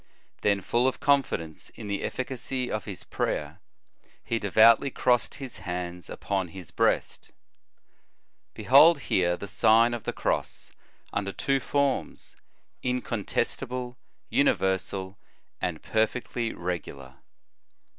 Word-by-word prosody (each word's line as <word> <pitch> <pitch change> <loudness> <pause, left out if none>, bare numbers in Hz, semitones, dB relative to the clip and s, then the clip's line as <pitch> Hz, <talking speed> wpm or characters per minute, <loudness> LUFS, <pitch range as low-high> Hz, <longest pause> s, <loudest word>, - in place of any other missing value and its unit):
Then, 100 -1 +2
full 120 +6 +1
of 130 - -1
confidence 125 - 0
in - - -8
the 100 -1 -2
efficacy 130 0 -3
of 110 - -3
his 100 -3 -7
prayer, - - -3 0.6
he 115 - -1
devoutly 110 +6 +5
crossed 125 -2 +1
his 135 -3 -7
hands 90 -1 -5
upon 95 -2 -2
his 90 -1 -10
breast.* - - 0 1.2
Behold 145 +4 +6
here 90 -6 +1
the 100 - -7
Sign 115 +2 +4
of 120 - -5
the - - -1
Cross - - -1 0.4
under 100 -1 -1
two 135 +7 0
forms, 140 +1 -1 0.5
incontestable, 125 +1 -2 0.4
universal, 95 +1 0 0.4
and 85 -3 -3
perfectly 115 +1 -1
reoailar. 70 -7 -6
110 Hz, 110 wpm, -27 LUFS, 95-125 Hz, 1.2 s, Behold